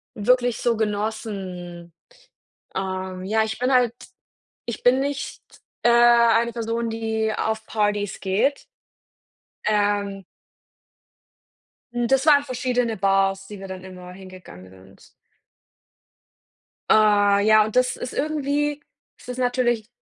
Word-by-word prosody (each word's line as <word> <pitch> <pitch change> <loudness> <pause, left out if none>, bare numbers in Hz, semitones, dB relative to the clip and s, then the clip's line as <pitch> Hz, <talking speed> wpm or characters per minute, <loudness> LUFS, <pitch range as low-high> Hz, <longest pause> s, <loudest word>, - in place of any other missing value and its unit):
wirklich 245 +2 +2
so 235 -1 0
genossen. 200 -5 -4 0.8
Ähm, 185 -1 -4
ja, 220 +3 +1
ich 220 +1 -5
bin 250 +2 +1
halt 245 -2 +3 0.7
ich 235 - -6
bin 255 +2 +4
nicht, 280 0 -4 0.4
äh, 240 - +4
eine 235 -1 +5
Person, 230 0 -3
die 220 -1 -2
auf 220 0 -2
Partys 205 -2 -1
geht. 225 +9 0 1.0
Ähm 205 -2 0 1.7
Hm, 240 -1 -1
das 270 +3 +2
waren 285 -2 +6
verschiedene 250 -4 -1
Bars, 195 0 +1
die 205 -2 -9
wir 195 - -8
dann 185 -1 -8
immer 180 -1 -11
hingegangen 185 - -13
sind. 95 0 -18 1.8
Äh, 205 -2 +4
ja, 215 -1 +6
und 215 - -7
das 250 0 +2
ist 250 - -7
irgendwie 295 0 -1 0.4
es - - -17
ist 250 0 -6
natürlich 245 -3 0
220 Hz, 115 wpm, -23 LUFS, 195-245 Hz, 1.8 s, waren